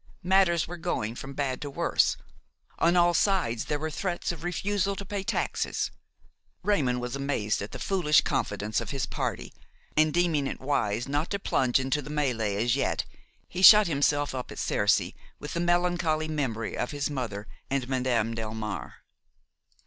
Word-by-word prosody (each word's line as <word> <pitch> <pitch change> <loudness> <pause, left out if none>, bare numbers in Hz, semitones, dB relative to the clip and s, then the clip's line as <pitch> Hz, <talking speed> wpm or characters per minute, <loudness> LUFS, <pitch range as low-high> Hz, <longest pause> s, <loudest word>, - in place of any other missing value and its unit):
Matters 180 -3 +3
were 175 +2 -7
going 110 -8 -2
from 135 +3 -8
bad 135 -2 -2
to 145 - -4
worse; 140 - +1 0.6
on 170 +2 +3
all 175 0 +5
sides 170 - +1
there 150 - -1
were 155 +1 -4
threats 175 +2 -2
of 165 -2 -9
refusal 195 +2 -1
to 200 - -7
pay 200 0 -3
taxes. - - -1 0.7
Raymon 135 -12 +1
was 125 +1 -4
amazed 135 -7 -1
at 100 - -5
the - - -6
foolish 150 +2 +3
confidence 105 +1 -1
of - - -6
his 135 -3 -1
party, - - -4 0.4
and 155 0 +4
deeming 165 -4 +1
it - - -5
wise 120 -4 -1
not 145 +4 -1
to 200 - -1
plunge 130 -10 +1
into 135 +2 0
the 145 - -10
mêlée 125 -9 0
as 120 +4 +1
yet, 140 - 0 0.4
he 180 - -5
shut 210 +2 +10
himself 145 -2 +1
up 125 -1 -5
at - - -9
Cercy - - +1 0.2
with 150 - -7
the 170 - -2
melancholy 175 -2 +1
memory 130 -8 -2
of 125 - -2
his 145 0 -2
mother 110 -7 -4 0.2
and 135 -2 -1
Madame 125 -4 0
Delmare. 110 -2 -5
145 Hz, 170 wpm, -27 LUFS, 125-175 Hz, 0.7 s, shut